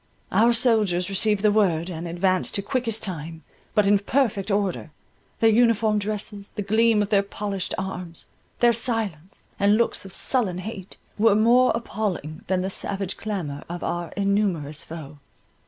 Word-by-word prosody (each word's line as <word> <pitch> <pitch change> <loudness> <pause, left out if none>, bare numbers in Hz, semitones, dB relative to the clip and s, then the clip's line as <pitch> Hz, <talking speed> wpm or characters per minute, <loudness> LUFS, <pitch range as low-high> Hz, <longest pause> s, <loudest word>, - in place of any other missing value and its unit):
Our 230 +2 +4
soldiers 215 -7 +2
received 205 +1 +1
the 210 - +5
word, 180 -6 +2
and 170 -1 -5
advanced 185 +2 0
to 200 - +1
quickest 230 -1 -1
time, 160 -3 -5 0.3
but 210 -2 +4
in 200 0 +4
perfect 210 -3 0
order: 200 -5 -1 0.5
their 225 -1 +5
uniform 225 -2 +3
dresses, 205 -1 -4
the 210 - -5
gleam 220 +1 +3
of 205 - -5
their 200 -2 +4
polished 200 -1 -4
arms, 180 -3 -6 0.4
their 240 0 +6
silence, 215 -8 -3
and 205 +1 +4
looks 235 - 0
of 195 - -10
sullen 200 -3 0
hate, 190 0 -7 0.2
were 220 -1 +5
more 240 +4 +5
appalling 195 -9 -4
than 185 0 +1
the 190 - -2
savage 195 -1 -3
clamour 175 -10 -4
of 175 0 -5
our 175 -1 -3
innumerous 195 -7 0
foe. 155 -3 -9
200 Hz, 155 wpm, -24 LUFS, 180-220 Hz, 0.5 s, their